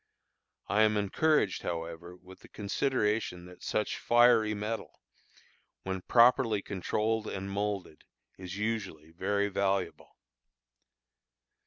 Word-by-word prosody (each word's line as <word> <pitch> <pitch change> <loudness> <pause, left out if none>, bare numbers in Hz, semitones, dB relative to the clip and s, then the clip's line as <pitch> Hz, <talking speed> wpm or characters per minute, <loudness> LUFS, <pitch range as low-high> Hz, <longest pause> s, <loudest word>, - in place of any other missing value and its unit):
I 105 - +2
am 110 -1 +4
encouraged, 105 - +1
however, 85 +1 -5
with 95 +1 -15
the - - -16
consideration 105 -4 -1
that 90 0 -14
such 105 - -2
fiery 120 -3 +4
metal, 105 +2 -5 0.8
when 95 -1 -3
properly 115 -2 +4
controlled 110 +3 -1
and 95 0 -5
moulded, 100 -5 -3 0.3
is 95 +1 -8
usually 100 -8 -3
very 100 +4 0
valuable. 100 -1 -2
100 Hz, 105 wpm, -30 LUFS, 95-110 Hz, 0.8 s, am